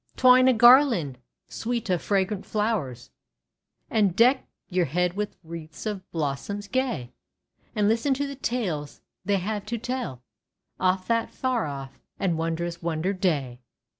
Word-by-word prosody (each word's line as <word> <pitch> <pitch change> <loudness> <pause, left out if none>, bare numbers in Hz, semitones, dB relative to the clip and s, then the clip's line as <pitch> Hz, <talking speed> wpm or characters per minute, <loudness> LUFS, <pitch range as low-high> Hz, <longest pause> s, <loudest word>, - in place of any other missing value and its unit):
twine 255 0 +6
a 260 - +6
garland 235 - +5 0.3
sweet 235 0 -3
of 180 -3 +1
fragrant 195 0 0
flowers, 210 - -2 0.8
And 205 -5 +2
deck 250 +4 +4 0.2
your 180 -2 +1
head 175 +5 0
with 205 +1 -4
wreaths 165 +1 -9
of 205 -3 -4
blossoms 165 +7 -3
gay. 245 - -1 0.6
And 210 -1 +2
listen 230 +5 +2
to 285 +2 -1
the 280 - -5
tales 195 - -3 0.2
they 200 -1 +2
have 205 +2 -3
to 235 +2 -2
tell 235 - -4 0.6
Of 185 0 +1
that 230 -1 0
far 255 -8 -1
off 135 -1 -7 0.2
and 180 -4 +1
wondrous 165 +1 -3
Wonder 170 +3 -1
Day 145 -10 -1
195 Hz, 140 wpm, -26 LUFS, 165-230 Hz, 0.8 s, twine